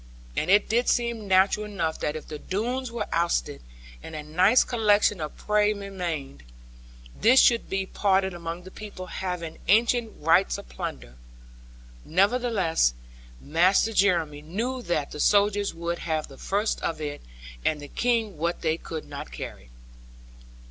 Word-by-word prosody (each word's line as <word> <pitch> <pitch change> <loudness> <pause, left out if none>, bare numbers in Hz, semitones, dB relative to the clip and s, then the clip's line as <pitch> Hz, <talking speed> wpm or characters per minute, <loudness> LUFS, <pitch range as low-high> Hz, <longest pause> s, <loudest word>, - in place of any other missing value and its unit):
And 155 - -1
it 205 +2 +5
did 240 +3 +1
seem 235 -3 0
natural 195 +3 +3
enough 180 -6 -2
that 150 - -2
if 155 - -7
the 150 -1 -7
Doones 245 - -2
were 235 - -3
ousted, 170 - 0 0.4
and 160 - -9
a 150 - -5
nice 185 +10 +4
collection 210 -5 +2
of 150 - -5
prey 210 0 +2
remained, 175 - -5 0.7
this 255 +4 +5
should 235 -1 +4
be 195 0 -1
parted 190 -1 +1
among 170 0 -6
the 185 - -11
people 205 -3 -8
having 180 -3 -5
ancient 230 +2 +3
rights 165 +5 +3
of - - -10
plunder. - - -6 0.9
Nevertheless, 195 - +2 0.4
Master 185 +8 +2
Jeremy 170 -8 +2
knew 230 +12 -3
that 155 -9 -2
the 150 - -7
soldiers 205 +2 +3
would 170 +1 -4
have 155 -2 -2
the 135 - -14
first 205 +3 -1
of 165 - -2
it, 145 -1 -5 0.4
and 155 - +1
the 145 - -8
King 225 -4 0
what 170 +2 -2
they 160 0 +1
could 160 -2 -7
not - - -8
carry. - - -8
185 Hz, 150 wpm, -26 LUFS, 160-210 Hz, 0.9 s, it